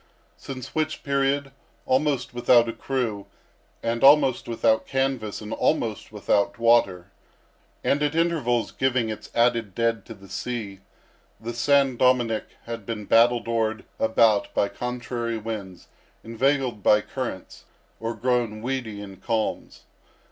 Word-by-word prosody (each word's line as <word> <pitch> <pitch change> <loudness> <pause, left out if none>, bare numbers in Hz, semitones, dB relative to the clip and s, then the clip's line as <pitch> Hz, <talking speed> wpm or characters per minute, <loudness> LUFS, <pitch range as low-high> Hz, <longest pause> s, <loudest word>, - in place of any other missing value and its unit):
Since 130 -3 -8
which 155 0 -2
period, 140 0 0 0.3
almost 135 -1 0
without 120 -1 +4
a 115 - -3
crew, 115 -7 -3 0.6
and 115 +1 -1
almost 140 -2 +5
without 115 -1 +1
canvas 135 -6 -1
and 105 +1 -6
almost 115 -11 -1
without 100 -1 0
water, 100 -6 +2 0.7
and, 140 - +1
at 150 +1 0
intervals 155 -9 +1
giving 130 -3 0
its 110 - -8
added 115 -4 +2
dead 115 -2 0
to - - -8
the 95 0 -15
sea, 100 0 -5 0.6
the 115 +2 -5
San 135 +1 +2
Dominick 120 -3 +1
had 115 -2 -6
been 105 0 -5
battle 120 +3 +4
dored 110 -1 -1 0.2
about 110 -2 +3
by 100 - +2
contrary 120 -1 -4
winds, 105 -5 -7 0.4
inveigled 125 0 0
by 105 +2 +5
currents, 120 -6 -6 0.3
or 115 +1 -3
grown 120 -4 -1
weedy 120 -5 -3
in 95 -1 -10
calms. 115 0 -3
115 Hz, 130 wpm, -25 LUFS, 110-130 Hz, 0.7 s, almost